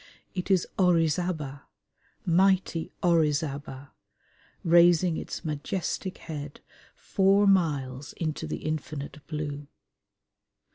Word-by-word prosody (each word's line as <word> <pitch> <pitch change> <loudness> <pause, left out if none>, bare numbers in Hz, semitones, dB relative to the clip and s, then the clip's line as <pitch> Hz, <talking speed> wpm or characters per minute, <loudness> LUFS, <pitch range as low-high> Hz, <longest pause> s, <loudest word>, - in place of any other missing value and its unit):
It 180 0 -4
is 190 -3 +3
Orizaba, 165 -5 +1 0.6
mighty 180 -1 +2
Orizaba, 145 -5 0 0.7
raising 175 0 +5
its - - -6
majestic 170 +5 -3
head 145 -3 -7 0.4
four 195 +1 +3
miles 145 -8 +1
into 155 -3 -3
the - - -5
infinite 155 -1 -4
blue. 145 -2 -4
160 Hz, 85 wpm, -27 LUFS, 145-180 Hz, 0.7 s, raising